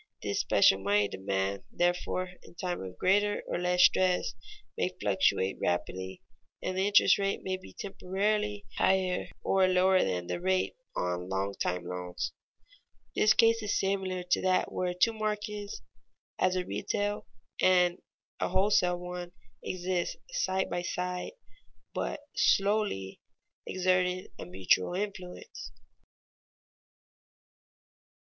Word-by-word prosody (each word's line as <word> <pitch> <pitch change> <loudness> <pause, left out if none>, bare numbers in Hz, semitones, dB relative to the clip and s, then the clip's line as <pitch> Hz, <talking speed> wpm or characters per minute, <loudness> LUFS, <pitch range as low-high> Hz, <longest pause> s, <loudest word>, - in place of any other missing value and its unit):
This - - -1
special 95 - +5
money 100 +1 +2
demand, 95 0 -2
therefore, 180 +1 0
in - - -17
time 180 0 -3
of 95 -1 -8
greater 205 +2 +2
or - - -2
less 180 0 +3
stress, 185 -1 +3 0.4
may - - 0
fluctuate 95 +1 +1
rapidly, 95 +2 -2 0.4
and 185 - -3
the 190 +1 +1
interest 205 0 +5
rate 195 0 -1
be 185 0 -5
temporarily 205 +2 -1
higher 185 -1 +2 0.2
or 190 -1 +3
lower 185 +1 +4
than 90 -2 -1
the 90 - -3
rate 185 - +1 0.2
on 90 0 -2
long 95 +1 -1
time 90 -2 -2
loans. 90 0 -4 0.8
This 215 +1 +5
case 230 0 +4
is 210 -1 0
similar 190 -2 -1
to 180 - +1
that 185 -1 +2
where 180 -1 -1
two 225 +6 +3
markets, 210 -1 -4 0.6
as 185 0 +2
a 180 -1 -1
retail 205 +2 -2 0.3
and 180 -1 +4 0.4
a - - 0
wholesale 185 -1 +3
one, 180 0 -6 0.3
exist 180 -1 -2
side 190 - 0
by 175 - -2
side, 180 - -3 0.6
but - - -3
slowly 195 - +1 0.5
exerting 185 0 +1
a - - -6
mutual 95 - +1
influence. 200 - -6
185 Hz, 120 wpm, -30 LUFS, 170-195 Hz, 0.8 s, special